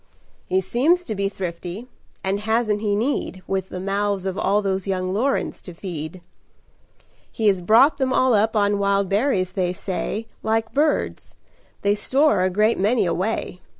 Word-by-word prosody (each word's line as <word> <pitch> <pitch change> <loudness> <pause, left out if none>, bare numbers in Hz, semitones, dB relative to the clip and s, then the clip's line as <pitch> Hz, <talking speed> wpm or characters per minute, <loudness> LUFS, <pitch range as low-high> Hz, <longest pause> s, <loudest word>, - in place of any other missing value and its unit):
"He 190 +1 +2
seems 300 - +2
to 220 - -3
be 200 -1 -1
thrifty; 180 +2 -6 0.4
and 195 +1 0
hasn't 215 -1 0
he 205 -2 +1
need, 210 -5 -2
With 190 -1 -2
the 180 - -6
mouths 195 0 -1
of 190 -1 -2
all 205 +1 +1
those 190 -1 -1
young 185 -1 -1
Lorens 260 +7 -1
to 180 - -11
feed? 170 -1 -6 1.1
He 225 - -3
has 195 -3 +3
brought 230 - +5
them 260 -1 +1
all 255 -1 +3
up 220 +1 +2
on 205 -1 +2
wild 200 -1 +1
berries, 195 -4 +1
they 180 -2 0
say, 200 +3 -3 0.2
Like 225 +1 -1
birds. 295 +2 0 0.5
They 200 0 +3
store 265 +3 +2
a 185 - +2
great 210 +4 +2
many 215 +4 +2
away. 180 +1 -2
200 Hz, 165 wpm, -22 LUFS, 185-225 Hz, 1.1 s, brought